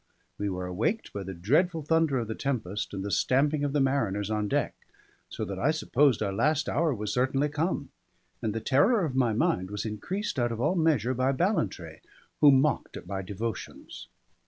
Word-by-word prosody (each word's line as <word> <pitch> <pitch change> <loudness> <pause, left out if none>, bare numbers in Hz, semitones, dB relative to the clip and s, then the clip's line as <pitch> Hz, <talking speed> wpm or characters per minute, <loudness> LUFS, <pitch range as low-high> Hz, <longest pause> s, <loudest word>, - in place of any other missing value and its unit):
We 100 0 -1
were 90 -1 -4
awaked 110 - -2
by 100 - -4
the 95 0 -6
dreadful 155 - +1
thunder 160 -2 +2
of 115 -3 -2
the 110 - -3
tempest 105 -7 -3
and 95 -1 -4
the 100 - -3
stamping 145 +6 +2
of 145 - 0
the 145 - +1
mariners 110 -7 0
on 105 -1 0
deck; - - 0 0.6
so - - -4
that 95 0 -5
I 140 - +2
supposed 145 -6 +2
our 100 -1 -1
last 150 +8 +1
hour 160 +1 +1
was 105 -4 -3
certainly 135 +3 +1
come; 150 -1 -2 0.5
and 110 -1 -2
the 115 - -2
terror 180 - +3
of 135 -5 -4
my 125 -4 +2
mind 95 -3 0
was 105 +1 -4
increased 135 - -3
out 120 -1 +1
of 115 - -4
all 150 +8 +2
measure 155 - +2
by 130 +2 +1
Ballantrae, 145 - -1 0.4
who 145 -2 +8
mocked 135 +2 +1
at - - -10
my 95 -1 -4
devotions. 105 +3 -6
130 Hz, 195 wpm, -28 LUFS, 105-150 Hz, 0.6 s, who